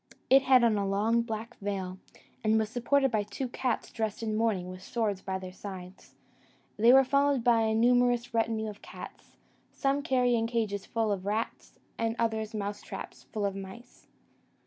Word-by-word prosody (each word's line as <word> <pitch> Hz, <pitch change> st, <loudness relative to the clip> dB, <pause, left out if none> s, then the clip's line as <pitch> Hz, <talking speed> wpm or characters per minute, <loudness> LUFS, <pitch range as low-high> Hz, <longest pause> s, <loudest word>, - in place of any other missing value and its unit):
It 270 Hz, +1 st, +8 dB
had 260 Hz, -2 st, +5 dB
on 220 Hz, -3 st, +3 dB
a 200 Hz, -, -1 dB
long 215 Hz, +4 st, +2 dB
black 225 Hz, +1 st, -5 dB
veil, 190 Hz, -2 st, -4 dB, 0.4 s
and 220 Hz, 0 st, +3 dB
was 220 Hz, -1 st, 0 dB
supported 270 Hz, +2 st, +2 dB
by 215 Hz, -2 st, +2 dB
two 205 Hz, +6 st, -4 dB
cats 245 Hz, -1 st, -2 dB
dressed 220 Hz, -1 st, -3 dB
in 215 Hz, -1 st, -1 dB
mourning 220 Hz, -4 st, +1 dB
and 180 Hz, -, -7 dB
with 185 Hz, 0 st, -9 dB
swords 210 Hz, -2 st, -2 dB
by 190 Hz, -1 st, -3 dB
their 185 Hz, -1 st, -8 dB
sides: 185 Hz, -1 st, -10 dB, 0.6 s
they 230 Hz, +3 st, +6 dB
were 270 Hz, +1 st, +8 dB
followed 280 Hz, -1 st, +2 dB
by 235 Hz, -1 st, +4 dB
a 220 Hz, 0 st, +1 dB
numerous 245 Hz, +1 st, +3 dB
retinue 225 Hz, -1 st, 0 dB
of 210 Hz, -1 st, -8 dB
cats, -, -, -11 dB, 0.3 s
some 275 Hz, 0 st, 0 dB
carrying 245 Hz, -4 st, +2 dB
cages 215 Hz, -4 st, -2 dB
full 225 Hz, -2 st, 0 dB
of 195 Hz, -1 st, -3 dB
rats, 215 Hz, +3 st, -3 dB, 0.2 s
and 225 Hz, 0 st, 0 dB
others 220 Hz, -1 st, -1 dB
mouse 205 Hz, 0 st, -3 dB
traps -, -, -9 dB
full 210 Hz, -3 st, -1 dB
of 200 Hz, -1 st, -1 dB
mice. 195 Hz, +5 st, -10 dB
220 Hz, 180 wpm, -29 LUFS, 205-240 Hz, 0.6 s, It